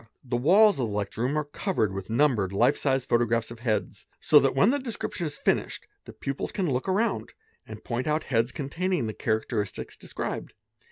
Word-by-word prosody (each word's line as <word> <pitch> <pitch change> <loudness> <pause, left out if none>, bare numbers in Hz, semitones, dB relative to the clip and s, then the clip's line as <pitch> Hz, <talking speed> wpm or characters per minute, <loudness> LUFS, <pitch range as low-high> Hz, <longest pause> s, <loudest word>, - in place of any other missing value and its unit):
The 125 -2 -3
walls 190 - +5
of 120 - 0
the - - -5
lecture 105 +2 -3
room 135 +5 0
are 150 - +1
covered 145 - -1
with 95 +1 -6
numbered 115 -6 +2
life 115 +5 +3
size 135 -2 0
Photographs 115 -1 +1
of 115 - -9
heads, 110 -6 -2
so - - +6
that - - +1
when 195 - +5
the 285 - 0
description 225 - -4
is 145 - -7
finished - - -1 0.2
the - - -10
pupils 135 0 -4
in 185 -7 0
look 130 +8 -1
around 210 +5 0 0.3
and - - -9
point 120 +3 -3
out 155 +1 +1
heads 115 -1 +1
containing 165 +1 -2
the 110 - -3
characteristics 110 -2 -2
des - - -12
| - - -11
'bed. - - -4
130 Hz, 205 wpm, -27 LUFS, 115-155 Hz, 0.3 s, so